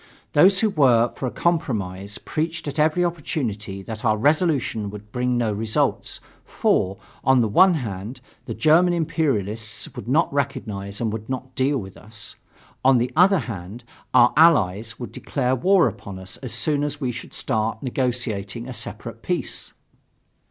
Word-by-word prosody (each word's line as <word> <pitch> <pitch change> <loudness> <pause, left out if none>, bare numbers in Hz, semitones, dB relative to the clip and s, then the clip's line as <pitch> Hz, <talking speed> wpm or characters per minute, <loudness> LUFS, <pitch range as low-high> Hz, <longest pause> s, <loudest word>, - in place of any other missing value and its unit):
Those 190 +6 +5
who 220 -2 +2
were 120 -7 +4
for 130 - -4
a - - -3
compromise 105 - -1
preached 165 +1 -3
at 145 - -4
every 160 +4 +3
opportunity 115 - -3
that 110 +1 -7
our 110 -2 +2
resolution 140 - +1
would 105 0 -10
bring 125 +1 0
no 115 -3 0
results; 110 +1 -1 0.2
for, 95 +1 0 0.3
on 130 -1 +4
the 115 - +3
one 180 - +5
hand, 110 -2 -5 0.3
the - - -5
German 170 +3 +4
imperialists 115 - -1
would - - -7
not 150 +4 +2
recognize 105 -8 -3
and 110 -2 -1
would 110 +1 -6
not 130 0 -5
deal 135 +3 +1
with 95 -5 -7
us; 105 0 -6 0.5
on 130 0 +6
the 120 +2 0
other 190 +3 +6
hand, 100 +1 -7 0.3
our 125 -1 +5
Allies 115 - +4
would 120 - -6
declare 130 -2 -1
war 185 +4 +4
upon 100 -3 -7
us 95 0 -8
as 130 -4 -7
soon 140 +6 0
as 145 0 -2
we 130 -4 -1
should 120 - -8
start 110 +1 -1
negotiating 120 -4 -2
a 130 - -6
separate - - -7
peace. - - -2
125 Hz, 160 wpm, -23 LUFS, 105-150 Hz, 0.5 s, on